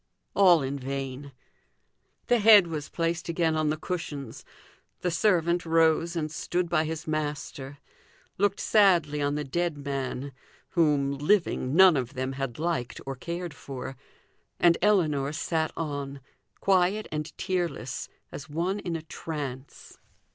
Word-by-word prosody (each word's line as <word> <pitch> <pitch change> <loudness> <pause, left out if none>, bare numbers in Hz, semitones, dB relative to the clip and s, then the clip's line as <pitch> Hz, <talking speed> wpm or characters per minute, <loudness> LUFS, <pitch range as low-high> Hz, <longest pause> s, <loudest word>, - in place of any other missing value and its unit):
All 180 -6 +6
in 140 +1 -3
vain. 135 +1 -5 0.9
The 245 - +3
head 210 -3 +8
was 155 -3 -5
placed 170 0 -2
again 165 -1 +1
on 155 -1 +1
the 155 - 0
cushions, 145 -7 -5 0.6
the 180 - 0
servant 175 -2 +2
rose 165 +1 +2
and 155 -2 -2
stood 175 +2 -2
by 160 -2 +2
his 160 +1 -4
master, 145 -2 -4 0.6
looked 200 0 +2
sadly 175 -8 +3
on 145 0 0
the 150 - -2
dead 170 +3 -1
man, 140 -1 -4 0.4
whom, 145 -4 +2
living, 150 -5 +1
none 185 -2 +8
of 130 +1 -3
them 130 +1 -2
had 135 -3 -4
liked 155 -7 -2
or 135 0 -4
cared 170 +4 -5
for, 135 -1 -7 0.6
and 170 -1 +5
Ellinor 155 -9 +2
sat 160 0 -1
on, 140 -3 -4 0.4
quiet 195 +2 +2
and 150 0 -3
tearless, 175 -8 -3 0.2
as 145 +2 -8
one 175 +7 -1
in 175 -4 -3
a 160 - -5
trance. 145 -5 -7
155 Hz, 140 wpm, -27 LUFS, 140-175 Hz, 0.9 s, head